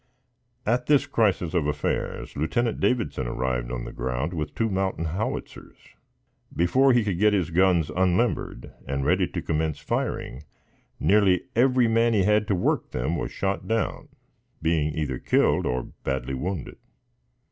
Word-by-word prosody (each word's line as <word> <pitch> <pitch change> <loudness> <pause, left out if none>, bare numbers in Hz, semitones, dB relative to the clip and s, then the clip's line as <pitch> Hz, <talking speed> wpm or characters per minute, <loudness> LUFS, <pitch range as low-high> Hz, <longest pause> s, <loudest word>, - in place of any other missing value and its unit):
At 120 +3 0
this 145 -1 +4
crisis 100 - +1
of 85 -5 +1
affairs, 75 0 -2
Lieutenant 115 - 0
Davidson 70 - 0
arrived - - -2
on - - -4
the - - -7
ground 65 +7 -2
with 75 -3 -4
two 115 - +1
mountain 95 -4 -1
howitzers. 90 +7 -4 0.8
Before 130 +11 +4
he 120 -2 +3
could 100 -5 -2
get 105 0 +4
his 90 -5 0
guns 90 -2 +3
unlimbered 95 - 0
and 70 0 -2
ready - - +2
to - - -4
commence 80 -1 -1
firing, 75 -3 -3 0.6
nearly 95 -3 +3
every 125 0 +4
man 115 +1 +3
he 100 - +3
had 105 +1 +2
to 100 - +1
work 90 - 0
them 65 +7 -2
was - - -3
shot 95 0 -2
down, 115 0 -1 0.5
being 80 -2 +1
either 65 -5 -2
killed - - +2
or 60 0 -1 0.2
badly 65 0 -2
wounded. 85 +4 -4
90 Hz, 150 wpm, -25 LUFS, 75-110 Hz, 0.8 s, this